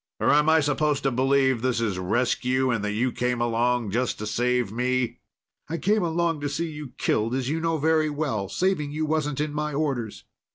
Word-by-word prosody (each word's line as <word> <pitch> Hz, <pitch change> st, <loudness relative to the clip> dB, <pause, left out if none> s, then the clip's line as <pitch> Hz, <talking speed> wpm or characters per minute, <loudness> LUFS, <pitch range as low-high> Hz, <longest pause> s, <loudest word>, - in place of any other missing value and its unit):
Or -, -, +3 dB
am 150 Hz, +1 st, +4 dB
I 160 Hz, 0 st, +5 dB
supposed 145 Hz, 0 st, 0 dB
to 135 Hz, -, +2 dB
believe 130 Hz, -1 st, +2 dB
this 125 Hz, -1 st, 0 dB
is 105 Hz, -5 st, -1 dB
rescue 125 Hz, +6 st, +1 dB
and 115 Hz, -4 st, -1 dB
that 105 Hz, 0 st, -1 dB
you 125 Hz, +4 st, 0 dB
came 125 Hz, 0 st, -1 dB
along 120 Hz, -1 st, +1 dB
just 125 Hz, +3 st, 0 dB
to 105 Hz, -, -5 dB
save 120 Hz, 0 st, 0 dB
me?" 125 Hz, 0 st, -1 dB, 0.5 s
"I 165 Hz, -, -2 dB
came 210 Hz, +5 st, +2 dB
along 170 Hz, -2 st, 0 dB
to 145 Hz, -, -2 dB
see 165 Hz, +3 st, -3 dB
you 150 Hz, -4 st, -8 dB
killed, 115 Hz, +4 st, 0 dB
as 130 Hz, -1 st, -2 dB
you 160 Hz, +2 st, -1 dB
know 165 Hz, 0 st, 0 dB
very 155 Hz, +1 st, +2 dB
well. 135 Hz, -10 st, -2 dB
Saving 180 Hz, -6 st, 0 dB
you 155 Hz, +1 st, -2 dB
wasn't 150 Hz, -2 st, -1 dB
in 150 Hz, 0 st, -1 dB
my 150 Hz, 0 st, -2 dB
orders." 135 Hz, -7 st, -2 dB
135 Hz, 205 wpm, -25 LUFS, 120-150 Hz, 0.5 s, I